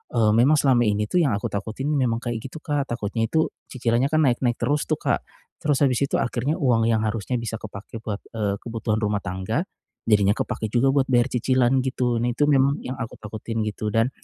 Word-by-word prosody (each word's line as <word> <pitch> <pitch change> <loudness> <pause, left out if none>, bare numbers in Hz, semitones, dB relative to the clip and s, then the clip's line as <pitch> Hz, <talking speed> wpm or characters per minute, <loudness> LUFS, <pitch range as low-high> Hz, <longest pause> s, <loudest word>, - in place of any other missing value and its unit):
eee, 110 -2 +4
memang 135 +7 +5
selama 130 -4 +4
ini 105 0 +1
tuh 180 +9 +1
yang 135 -10 +2
aku - - -6
takutin 110 +8 -3
memang 125 -5 +1
kayak 120 -2 -3
gitu, 135 +5 -8
Kak. 145 -2 -1
Takutnya 115 0 -2
itu, 160 0 +2 0.2
cicilannya 125 +1 +1
kan 155 0 +3
naik-naik 120 -1 +1
terus 145 +5 -1
tuh, - - +1
Kak. - - 0 0.4
Terus 145 -2 +2
habis 125 -1 +1
itu 140 - +1
akhirnya 130 +7 -1
uang 115 -7 +2
yang 110 -1 +2
harusnya 115 +3 -2
bisa 115 -1 -4
kepake 110 +2 -8
buat, 105 -3 -3 0.2
eee, 100 -3 -1
kebutuhan 115 -2 -2
rumah 105 -2 0
tangga, 95 +1 -2 0.5
jadinya 105 -1 +4
kepake 110 -3 -3
juga 125 +3 +3
buat 135 -2 +3
bayar 120 +1 +3
cicilan 130 +1 +2
gitu. 125 -2 0
Nih 120 +1 0
tuh 150 0 +3
memang 140 0 +4
yang 130 0 -5
aku 115 - -5
takutin 110 +1 -4
gitu. 105 0 -3
Dan, 115 +3 +3
120 Hz, 205 wpm, -24 LUFS, 110-135 Hz, 0.5 s, memang